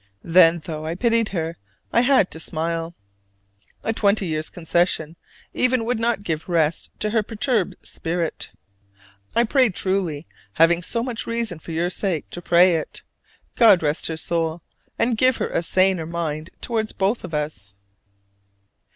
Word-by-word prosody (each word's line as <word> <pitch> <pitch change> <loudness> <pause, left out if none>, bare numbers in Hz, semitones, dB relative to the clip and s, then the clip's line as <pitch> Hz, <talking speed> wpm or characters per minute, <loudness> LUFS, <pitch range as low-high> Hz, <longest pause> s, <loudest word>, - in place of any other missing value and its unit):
Then 165 -1 +5
though 155 -1 -5
I 165 - -2
pitied 230 +2 +1
her, 165 -3 -3 0.4
I 235 - +5
had 250 -6 +3
to 160 - -6
smile. 165 +1 -2 0.9
A 225 - 0
twenty 200 -2 +2
years' 155 -2 -2
concession 170 -2 0 0.4
even 255 -2 +1
would 240 -1 -1
not 230 -3 0
give 165 -2 -3
rest 165 -2 +1
to 215 - +1
her 225 0 +2
perturbed 220 -1 -1
spirit. 165 0 -3 0.9
I 235 - +5
pray 255 +1 +3
truly 185 -5 -1 0.3
having 165 +4 +4
so 230 +6 -2
much 240 -3 -3
reason 230 -7 -2
for 165 - -9
your 170 +2 -1
sake 185 -6 -2
to 175 - -5
pray 175 0 +5
it 155 - -7 0.5
"God 210 -8 +6
rest 150 +1 0
her 160 - -4
soul! 165 0 -1 0.3
and 230 -2 +1
give 255 -1 +4
her - - -2
a - - 0
saner 185 -1 +2
mind 160 -2 -4
toward 225 -3 -2
both 200 +5 0
of 160 - -5
us." 145 -10 -3
175 Hz, 155 wpm, -22 LUFS, 165-220 Hz, 0.9 s, God